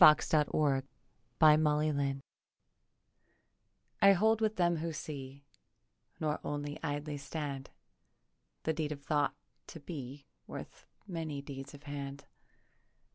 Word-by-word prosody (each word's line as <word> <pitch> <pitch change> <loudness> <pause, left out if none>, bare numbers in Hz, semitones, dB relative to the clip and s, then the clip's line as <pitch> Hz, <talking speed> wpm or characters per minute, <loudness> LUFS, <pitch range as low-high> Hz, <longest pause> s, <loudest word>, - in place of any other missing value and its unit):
DESERT 150 0 +7 0.9
THOUGHTS 150 -3 +4 1.8
I 200 - +9
hold 220 +4 +3
with 215 -1 +2
them 175 -3 +3
who 165 +1 -2
see 140 -3 -6 0.8
Nor 155 -1 0
only 145 0 -3
idly 145 -1 -2
stand 140 -1 -4 0.9
The 160 - +1
deed 155 -1 -1
of 140 -1 -11
thought 145 0 +1 0.3
to 165 - -8
be 140 -3 -7 0.2
Worth - - -8 0.2
many 160 -7 -4
deeds 135 0 -7
of 145 - -14
hand. 140 -1 -5
150 Hz, 105 wpm, -33 LUFS, 140-160 Hz, 1.8 s, I